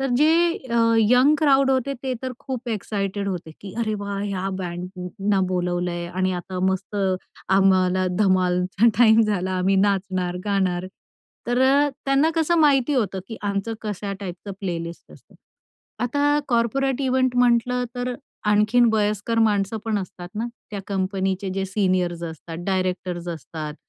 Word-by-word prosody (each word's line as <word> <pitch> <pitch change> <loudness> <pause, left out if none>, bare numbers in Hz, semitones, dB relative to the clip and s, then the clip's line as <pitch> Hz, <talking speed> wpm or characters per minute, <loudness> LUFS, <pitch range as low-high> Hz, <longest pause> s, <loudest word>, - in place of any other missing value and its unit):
तर 270 - 0
जे 305 +3 +5 0.4
अ, 235 - +2 0.2
young 250 +7 +5
crowd 275 -3 +4
होते, 265 +1 0
ते 260 -1 -2
तर 255 -1 -3
खूप 255 -2 -6
एक्साइटेड 200 -2 -2
होते, 175 -4 -4
की 195 -2 -9
अरे 215 -2 0
वाह!. 200 0 -4
ह्या 195 -1 -2
बँडना 180 +3 -3
बोलवलंय 175 -1 -1
आणि 185 +1 -1
आता 185 +1 -7
मस्त 190 +2 -4 0.5
आम्हाला 185 -1 +3
धमालचा 185 +1 +2
टाईम 225 -2 +6
झाला 195 -3 -1
आम्ही 190 +1 +2
नाचणार, 185 -2 -1
गाणार 185 -3 0 0.6
तर 245 +1 +1 0.4
त्यांना 275 +4 +3
कसं 330 +1 +2
माहिती 285 -2 +4
होतं, 200 -7 0
की 225 - -6
आमचं 200 +2 -2
कशा 205 -1 -4
टाईपचं 190 +1 -6
प्लेलिस्ट 170 -3 -5
असतं. - - -19 0.7
आता 290 +3 +2
कॉर्पोरेट 250 +3 +1
इव्हेंट 255 -1 +1
म्हटलं 245 0 +3
तर 245 0 -2 0.3
आणखीन 210 +4 +4
वयस्कर 210 +1 0
माणसं 210 0 +1
पण 215 -2 0
असतात 185 -2 -7
ना 230 - -1 0.2
त्या 200 -2 -4
कंपनीचे 190 0 -1
जे 195 0 -1
सीनियर्स 185 -3 0
असतात, 165 0 -7
डायरेक्टर्स 185 -2 -2
असतात 155 -2 -6
200 Hz, 140 wpm, -23 LUFS, 185-240 Hz, 0.7 s, टाईम